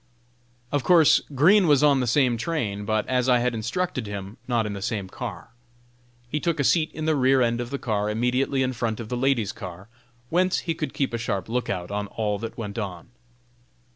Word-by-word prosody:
Of 145 -2 0
course 170 -4 +6
Green 185 +7 +5
was 145 -2 +4
on 145 -2 +5
the 125 - 0
same 125 0 +3
train, 110 -7 -2
but, 110 0 0
as 130 0 +1
I 125 - +5
had 120 0 0
instructed 125 - -2
him, 100 +2 -6
not 120 -3 +1
in 105 - -3
the 100 - -6
same 100 -1 -2
car. - - -7 0.8
He 150 +5 -2
took 165 -1 -1
a - - +2
seat 160 +3 +3
in 155 - -4
the 160 -1 +2
rear 135 -1 +4
end 120 0 0
of 120 - -5
the 140 - -3
car 105 -5 -1
immediately 125 +4 +1
in 130 0 -1
front 115 -2 -2
of 110 -2 -7
the 125 - -2
ladies' 120 -5 +1
car, 95 +2 -9 0.4
whence 180 +2 +2
he 165 - -2
could 155 - -5
keep 135 -4 -1
a 115 - -1
sharp 100 -5 -2
lookout 100 -6 -2
on 105 0 -2
all 105 -1 -2
that 115 0 -6
went 110 -1 -5
on. 95 -2 -6
120 Hz, 210 wpm, -25 LUFS, 105-140 Hz, 0.8 s, course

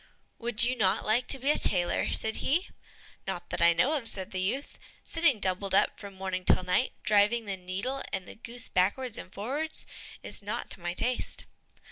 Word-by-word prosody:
"Would 235 -1 +1
you 250 +2 +2
not 195 -6 +1
like 230 +4 +1
to 270 - +8
be 270 +3 +1
a - - +2
tailor?" 175 -2 +3
said 220 0 +4
he. 340 +8 0 0.6
"Not - - -5
that - - -3
I 170 - +7
know 250 - +2
of," 260 -7 0
said 190 -4 -2
the 185 - -2
youth; 255 +10 -3 0.2
"sitting 325 -9 +2
doubled 190 0 -1
up - - +2
from 200 -2 -9
morning 190 -1 -3
till 185 - +3
night, 180 +8 +1
driving 210 +3 +3
the 200 -1 -3
needle 195 +9 -4
and 190 -2 -4
the - - -9
goose 235 +1 -3
backwards 225 +6 0
and 185 - -10
forwards, 285 +11 -2 0.4
is - - -9
not 215 +4 -5
to - - -3
my 175 0 -4
taste." 250 +5 -1
215 Hz, 195 wpm, -29 LUFS, 190-250 Hz, 0.6 s, to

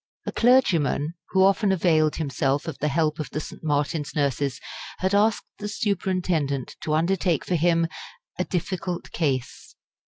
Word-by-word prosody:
A - - -2
clergyman 170 - +3 0.2
who 190 -1 +4
often 195 +1 +3
availed 160 -4 +3
himself 140 -1 -1
of 160 - -3
the 150 - 0
help 155 +1 +1
of 155 - -4
the - - -3
St. 155 - -9
Martin's 150 0 -1
nurses 140 -1 0 0.4
had 190 +1 -1
asked 215 +2 +3
the 210 - -4
superintendent 180 - -1
to 155 - 0
undertake 170 -1 +1
for - - -2
him 170 0 +3 0.5
"a - - +3
difficult 180 0 -3
case." 135 -6 -2
165 Hz, 150 wpm, -25 LUFS, 150-185 Hz, 0.5 s, who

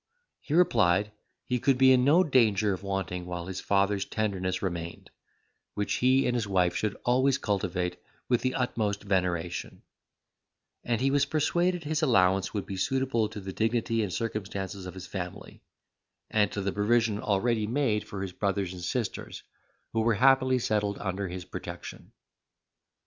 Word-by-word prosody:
He 150 - -3
replied, 105 - +3 0.3
he 125 -1 -1
could 135 +1 +2
be 130 0 +6
in 125 -1 +5
no 155 +7 +5
danger 110 - +3
of 95 - -6
wanting 95 -3 -3
while 90 -1 -4
his 95 0 -5
father's 100 0 +1
tenderness 95 -4 -2
remained, 85 -3 -5 0.6
which 105 - -1
he 130 +2 +3
and 125 - +1
his 115 -4 -1
wife 90 -3 +2
should 105 -2 -1
always 130 +2 +3
cultivate 90 -5 -2 0.3
with 120 -2 +2
the 130 0 -1
utmost 110 -5 -1
veneration; 90 -3 -2 1.0
and 120 -1 -1
he 135 +1 +2
was 140 0 +3
persuaded 175 +3 +1
his 150 +1 -1
allowance 95 -9 +3
would 105 -3 -3
be 95 -2 -6
suitable 125 0 0
to - - -7
the 95 -1 -7
dignity 115 +1 0
and 105 -4 -2
circumstances 100 -2 -4
of 90 - -8
his 95 -1 -8
family, 90 -1 -7 0.7
and 105 -2 +2
to 100 - -3
the 100 0 -1
provision 110 +1 +1
already 110 +1 0
made 115 -3 +1
for 100 -1 -5
his 95 -2 -5
brothers 100 -2 -1
and 90 - -8
sisters, 115 +5 -4 0.5
who 115 - +1
were 115 0 +2
happily 130 +2 +4
settled 105 -4 0
under 95 0 -3
his 90 0 -6
protection. - - -8
105 Hz, 160 wpm, -28 LUFS, 95-125 Hz, 1.0 s, be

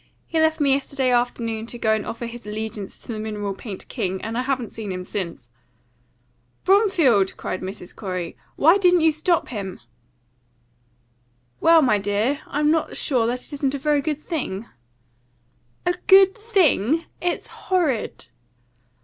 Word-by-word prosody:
He 325 - -1
left 315 0 +3
me 280 -2 +4
yesterday 270 -1 0
afternoon 230 -2 0
to 240 - -5
go 220 -2 +2
and 215 -1 -2
offer 235 +1 -5
his 235 -1 -8
allegiance 215 -1 -5
to - - -19
the 215 - -5
Mineral 210 -2 -3
Paint 195 -1 -8
King, 190 0 -2
and 225 +1 -4
I 245 - +1
haven't 255 -3 -2
seen 215 -3 -6
him 185 0 -4
since." 170 - -5 1.1
"Bromfield!" 345 - +3
cried 185 - -4
Mrs. 190 -1 -7
Corey. 185 -4 -4 0.2
"Why 330 +7 +5
didn't 360 -2 +5
you 320 0 +5
stop 315 +3 0
him?" 195 -6 -5 1.8
"Well, 330 -1 +6
my 215 -6 +3
dear, 210 +9 0
I'm 295 +1 +1
not 320 -1 0
sure 245 -5 +1
that 250 +1 -2
it - - -10
isn't 280 -1 -1
a - - -1
very 295 +1 +1
good 305 0 -3
thing." 235 - -3 1.2
"A 355 - +3
good 385 0 +8
thing? 335 - +2 0.2
It's 350 0 -1
horrid!" 330 - -1
250 Hz, 155 wpm, -23 LUFS, 210-315 Hz, 1.8 s, good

